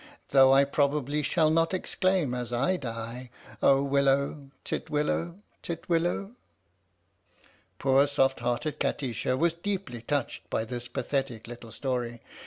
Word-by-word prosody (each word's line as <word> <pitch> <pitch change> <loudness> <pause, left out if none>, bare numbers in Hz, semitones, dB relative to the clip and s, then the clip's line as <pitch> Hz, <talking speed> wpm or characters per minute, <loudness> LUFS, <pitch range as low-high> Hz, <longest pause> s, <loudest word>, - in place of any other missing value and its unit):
Though 135 -1 +7
I 135 +1 +6
probably 145 +1 0
shall 155 +2 +2
not 165 +3 +2
exclaim 185 -6 0
as 125 -1 -4
I 135 +10 +1
die 120 -3 -6 0.2
" - - -18
Oh 135 0 +5
willow, 140 0 +1 0.2
titwillow, 160 +4 -1 0.2
titwillow! 170 +3 -1 0.7
" - - -34
Poor 135 +1 +4
soft 135 -2 +2
hearted 120 +5 -2
Kati 130 -4 -1
sha 130 +3 0
was 165 +4 +2
deeply 170 - -4
touched 140 +2 -3
by 110 - -1
this 120 +1 -5
pathetic 130 -4 -2
little 120 -1 -10
story. 120 -1 -3
140 Hz, 135 wpm, -28 LUFS, 125-155 Hz, 0.7 s, Though